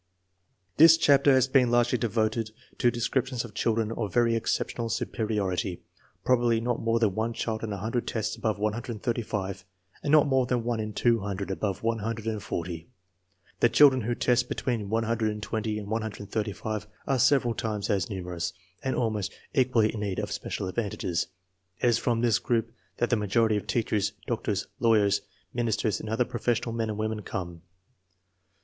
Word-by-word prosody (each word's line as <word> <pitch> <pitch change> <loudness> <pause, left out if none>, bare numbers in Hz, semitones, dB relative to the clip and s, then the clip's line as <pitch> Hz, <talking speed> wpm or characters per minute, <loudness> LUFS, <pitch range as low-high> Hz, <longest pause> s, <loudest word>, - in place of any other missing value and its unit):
This 165 +1 +9
chapter 140 -3 +5
has 130 -1 +4
been 130 -2 +4
largely 120 0 +3
devoted 110 0 0 0.3
to 120 - +4
descrip 125 +2 0
tions 125 -2 -3
of 110 - -11
children 110 +1 0
of 110 -4 -3
very 115 +2 +3
exceptional 115 +1 -1
superiority. 100 -6 -2 0.4
Probably 120 -2 +3
not 120 +1 -1
more 115 0 +2
than 110 -4 +2
one 110 +3 -1
child 110 -1 -3
in 110 - -3
a 100 - -3
hundred 115 +5 -2
tests 110 -1 -2
above 110 -3 -1
135 105 -3 -2 0.4
and 145 - -1
not 155 -1 +7
more 130 -3 +2
than 120 -2 0
one 120 -1 -1
in 105 -1 -3
two 115 +2 +3
hundred 100 -1 -4
above 95 0 -2
140. 110 -7 -3 0.7
The 120 - +5
children 135 -2 +6
who 120 +2 -1
test 125 +1 +2
between 115 -6 -2
120 110 -1 -1
and 105 -1 -6
135 105 -1 -3 0.2
are 135 -2 +1
several 125 -2 +4
times 110 -1 -2
as 95 -4 0
numerous, 90 -2 -4 0.3
and 130 - 0
almost 105 -4 -1 0.2
equally 125 -5 +3
in 110 - -4
need 100 -3 -2
of - - -3
special - - -3
advantages. 95 -4 -2 0.5
It 120 - +3
is 115 - +3
from 115 -1 0
this 120 -2 +3
group 115 -1 0 0.3
that 120 - 0
the - - +5
majority 110 +2 +2
of 105 0 -3
teachers, 105 -3 0
doctors, 105 -4 -1
lawyers, 105 -4 +3 0.3
min 120 -1 0
isters 110 -2 0
and 110 - -6
other 115 +3 +1
professional 120 0 -1
men 115 -1 -1
and 105 - -3
women 110 0 -2
come. 90 -5 -5
110 Hz, 165 wpm, -27 LUFS, 105-120 Hz, 0.7 s, This